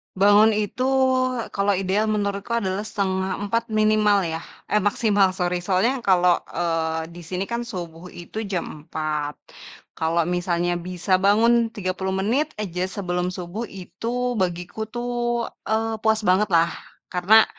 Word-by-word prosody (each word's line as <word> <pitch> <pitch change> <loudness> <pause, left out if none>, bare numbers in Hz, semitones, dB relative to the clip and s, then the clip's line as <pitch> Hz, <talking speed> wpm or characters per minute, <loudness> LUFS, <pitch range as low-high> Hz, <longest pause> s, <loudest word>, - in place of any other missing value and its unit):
Bangun 205 +3 +6
itu 215 +4 -1 0.7
kalau 200 0 +2
ideal 195 +3 0
menurutku 205 +2 -1
adalah 190 -2 -1
3:30 200 +2 -1
minimal 215 -2 +3
ya, 160 0 -3 0.3
eh 210 - +4
maksimal 205 -1 +3
sorry. 180 -1 0
Soalnya 200 +9 +1
yang - - -13
kalo, 180 -1 +4
eee, 165 -1 -1
di 175 - -10
sini 180 +3 -3
kan 235 0 -1
subuh 175 -4 -7
itu 175 +5 -8
jam 185 -3 -2 0.2
4.00. 150 -2 -2 0.6
Kalo 165 +1 +1
misalnya 175 0 0
bisa 180 +1 0
bangun 230 +4 +4
30 190 -1 -2
menit 240 +11 +1
aja 180 -2 -2
sebelum 180 -2 -2
subuh 180 +6 -5
itu 230 +7 -3
bagiku 180 +4 -2
tuh, 240 0 -1 0.2
eee, 225 0 0
puas 220 0 +2
banget 195 +3 +3
lah, 165 +1 +4 0.4
karena 205 +5 +6
195 Hz, 135 wpm, -23 LUFS, 180-220 Hz, 0.7 s, Bangun